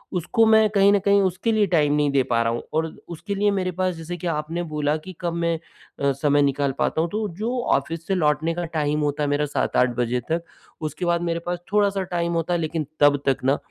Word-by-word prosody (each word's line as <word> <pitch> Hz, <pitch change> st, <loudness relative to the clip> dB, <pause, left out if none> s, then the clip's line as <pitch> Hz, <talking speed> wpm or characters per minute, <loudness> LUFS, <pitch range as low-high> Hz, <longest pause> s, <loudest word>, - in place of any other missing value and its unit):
उसको 200 Hz, +6 st, +2 dB
मैं 220 Hz, -1 st, +5 dB
कहीं 200 Hz, -1 st, +4 dB
न 205 Hz, -, +4 dB
कहीं 200 Hz, 0 st, +5 dB
उसके 190 Hz, +4 st, 0 dB
लिए 215 Hz, -2 st, +3 dB
टाइम 150 Hz, -5 st, +2 dB
नहीं 150 Hz, -1 st, +2 dB
दे 140 Hz, -1 st, +3 dB
पा 115 Hz, -2 st, +1 dB
रहा 115 Hz, -, 0 dB
हूँ 120 Hz, -, -3 dB
और 160 Hz, +1 st, +1 dB, 0.2 s
उसके 185 Hz, +4 st, -5 dB
लिए 205 Hz, +1 st, +2 dB
मेरे 185 Hz, -2 st, -1 dB
पास 185 Hz, -1 st, +1 dB
जैसे 165 Hz, +2 st, -6 dB
कि 175 Hz, -, -5 dB
आपने 165 Hz, +2 st, -2 dB
बोला 150 Hz, -2 st, -1 dB
कि 180 Hz, +4 st, -10 dB
कब 170 Hz, -1 st, -1 dB
मैं 170 Hz, -1 st, 0 dB, 0.4 s
अ, 140 Hz, 0 st, +2 dB
समय 145 Hz, +1 st, +2 dB
निकाल 140 Hz, 0 st, +1 dB
पाता 160 Hz, -, +1 dB
हूँ 170 Hz, -, -1 dB
तो 215 Hz, +3 st, -2 dB
जो 235 Hz, +5 st, -2 dB, 0.2 s
ऑफ़िस 165 Hz, 0 st, -3 dB
से 195 Hz, -, +1 dB
लौटने 155 Hz, -1 st, +1 dB
का 175 Hz, +1 st, -3 dB
टाइम 150 Hz, 0 st, 0 dB
होता 150 Hz, 0 st, -1 dB
है 145 Hz, -, 0 dB
मेरा 145 Hz, +1 st, +1 dB
7-8 125 Hz, -3 st, +1 dB
बजे 120 Hz, +1 st, 0 dB
तक, 165 Hz, +1 st, 0 dB, 0.4 s
उसके 155 Hz, +3 st, -3 dB
बाद 170 Hz, 0 st, +1 dB
मेरे 170 Hz, -1 st, -1 dB
पास 175 Hz, 0 st, -2 dB
थोड़ा-सा 200 Hz, -2 st, +2 dB
टाइम 170 Hz, -1 st, -2 dB
होता 165 Hz, +1 st, -1 dB
है 175 Hz, -, +1 dB
लेकिन 160 Hz, -1 st, -2 dB
तब 145 Hz, -1 st, +4 dB
तक 135 Hz, -1 st, +1 dB
ना, 135 Hz, +2 st, +3 dB
165 Hz, 240 wpm, -23 LUFS, 145-185 Hz, 0.4 s, मैं